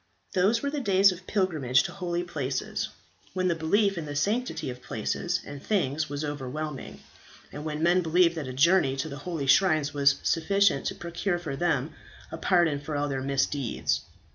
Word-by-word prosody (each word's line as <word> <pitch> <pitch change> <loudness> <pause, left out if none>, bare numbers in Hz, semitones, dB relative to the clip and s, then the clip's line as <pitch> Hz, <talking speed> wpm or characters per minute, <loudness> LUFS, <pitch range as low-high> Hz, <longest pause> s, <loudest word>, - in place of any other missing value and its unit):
Those 205 +6 +2
were 280 - -1
the 295 - -2
days 195 -5 +4
of 185 0 -10
pilgrimage 155 - +2
to - - -5
holy 175 -2 -3
places, 145 -6 -3 0.5
when 185 0 +1
the - - +3
belief 195 +4 +1
in 155 - -6
the 145 - -5
sanctity 205 - -1
of 125 0 -10
places 175 +12 -2
and 145 -1 -8
things 155 -6 0
was 145 +1 -3
overwhelming, 145 0 -5 0.5
and 145 - -7
when 155 0 -3
men 175 +2 +4
believed 170 +1 +3
that 155 -5 -5
a - - -4
journey 140 +1 +3
to 135 +4 -3
the 140 - -7
holy 160 -5 -2
shrines 155 -1 +3
was 140 0 +4
sufficient 185 -2 +2
to - - -3
procure 175 +2 -2
for 160 -6 -5
them 150 -3 0 0.4
a - - -5
pardon 170 -5 +2
for 145 +1 -5
all 145 0 0
their 135 -1 -2
misdeeds. 135 -1 0
160 Hz, 185 wpm, -27 LUFS, 140-180 Hz, 0.5 s, days